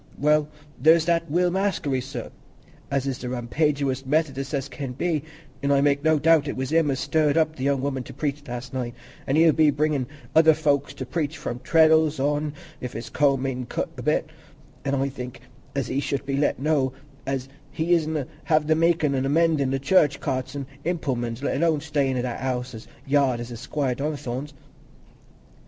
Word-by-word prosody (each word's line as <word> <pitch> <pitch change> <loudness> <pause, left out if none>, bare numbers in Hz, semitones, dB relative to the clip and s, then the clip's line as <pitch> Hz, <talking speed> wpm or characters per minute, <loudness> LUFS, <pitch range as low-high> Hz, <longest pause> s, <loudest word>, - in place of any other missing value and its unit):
But 150 +1 +3 0.3
there's 160 +1 +6
that 170 -1 +1
Will 175 +3 +2
Maskery, 175 -9 0
sir 135 +2 -6 0.6
as 140 -1 0
is 135 -2 -2
the 125 - -5
rampageousest 135 +2 -1
Methodis 135 -2 0
as 140 -2 -2
can 135 -1 -6
be, 155 +3 0 0.4
an' 140 +1 +1
I 140 -1 +4
make 140 0 +2
no 160 0 +4
doubt 155 0 +4
it - - -3
was 130 +2 -3
him 160 -2 +3
as 135 -1 -1
stirred 150 +1 +2
up 155 -1 +2
th' - - -17
young 135 0 +1
woman 135 -2 -1
to - - -9
preach 145 -1 -2
last 125 +1 -6
night, 125 -2 -3 0.3
an' 135 - +1
he'll 160 +1 +6
be 155 0 +4
a - - +5
bringin' 145 -3 0 0.3
other 160 -1 +7
folks 145 -3 0
to 130 - -5
preach 150 +2 -2
from 120 - -5
Treddles'on, 155 -1 +3 0.3
if 125 -1 -6
his 115 +2 -6
comb 140 -3 +2
isn't 125 -2 -3
cut - - -2
a - - -7
bit; - - +1 0.6
an' 140 0 0
I 135 0 +1
think 125 -2 -7 0.4
as 135 -2 0
he 130 +3 -1
should 140 -1 -2
be 135 0 -1
let 145 +1 +1
know 140 -3 +1 0.3
as 135 -1 -2 0.2
he 165 +2 +1
isna 155 -4 +1
t' - - -21
have 155 -1 +3
the 155 - +3
makin' 160 -2 +2
an' 135 +1 0
mendin' 155 -4 +2
o' 135 - +1
church 145 0 +3
carts 130 -1 -3
an' 140 -1 -4 0.2
implemen's, 130 -8 -2
let 140 - 0
alone 160 0 +2
stayin' 145 -4 0
i' 125 - -1
that 125 -2 -3
house 125 -1 -2
an' 110 - -7 0.2
yard 135 -3 +2
as 120 +1 -6
is 115 - -7
Squire 130 +1 -1
Donnithorne's." 140 0 -4
140 Hz, 200 wpm, -25 LUFS, 130-155 Hz, 0.6 s, other